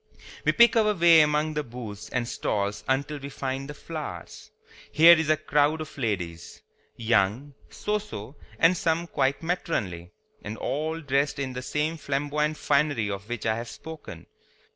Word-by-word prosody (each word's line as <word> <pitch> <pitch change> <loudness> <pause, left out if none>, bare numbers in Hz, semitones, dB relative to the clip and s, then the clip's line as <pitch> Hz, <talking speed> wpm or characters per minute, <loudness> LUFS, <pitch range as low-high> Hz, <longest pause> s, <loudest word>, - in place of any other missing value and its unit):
We - - +5
pick 235 -1 +6
our 215 -2 +3
way 170 -2 +7
among 150 +1 +1
the 150 0 -1
booths 110 -4 -8
and 120 -2 -1
stalls 100 -3 -2
until 140 +3 -1
we 140 0 -7
find 135 0 -4
the 150 - -7
flowers. 150 - -7 0.4
Here 165 +3 +8
is 160 -2 -1
a 155 - +4
crowd 150 +2 +2
of 155 - -7
ladies, 90 -9 -4 0.3
young, 115 +4 +1 0.2
so 210 0 -2
so 140 - -9 0.2
and 165 +2 +5
some 165 0 0
quite 140 -3 0
matronly, 100 - -2 0.3
and 105 +2 -6
all 160 +3 -2
dressed 140 0 0
in 135 -2 -3
this 125 0 -6
same 155 +2 -1
flamboyant 150 +1 -1
finery 140 -10 +1
of 100 +2 -6
which 120 -2 -4
I 110 -1 +2
have 115 0 -6
spoken. 155 - -10
140 Hz, 165 wpm, -26 LUFS, 115-155 Hz, 0.4 s, Here